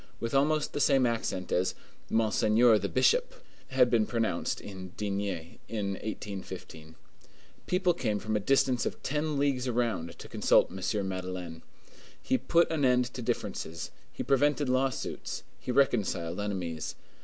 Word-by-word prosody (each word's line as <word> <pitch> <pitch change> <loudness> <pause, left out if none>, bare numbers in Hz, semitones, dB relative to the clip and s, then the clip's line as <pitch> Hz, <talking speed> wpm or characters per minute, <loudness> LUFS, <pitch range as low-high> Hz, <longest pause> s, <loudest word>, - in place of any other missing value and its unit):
with 115 +2 -3
almost 150 +2 +2
the - - -2
same 135 -3 +4
accent 115 -6 -2
as 90 +1 +1 0.3
"Monseigneur 110 +1 +4
the - - -2
Bishop" - - +3 0.3
had 130 -2 +3
been 115 -3 +3
pronounced 115 -2 -1
in 95 -2 -8
D—— 105 - -2 0.6
in 105 -3 -2
1815. 95 -6 -6 0.7
People 180 -1 +2
came 110 -10 -1
from 110 +1 -2
a - - +2
distance 130 +3 +2
of - - -6
ten 150 +1 -1
leagues 135 -2 +1
around 115 -9 -1
to - - -9
consult - - +3
M. 95 +2 -2
Madeleine. 90 -3 -5 0.6
He 260 0 0
put 170 0 +3
an 155 -3 0
end 125 -1 +3
to 125 - -5
differences, 80 -7 -3 0.2
he - - -4
prevented 145 0 +2
lawsuits, 130 -1 -1 0.2
he - - -3
reconciled 100 -10 +1
enemies. 90 -6 -3
115 Hz, 145 wpm, -30 LUFS, 95-135 Hz, 0.7 s, same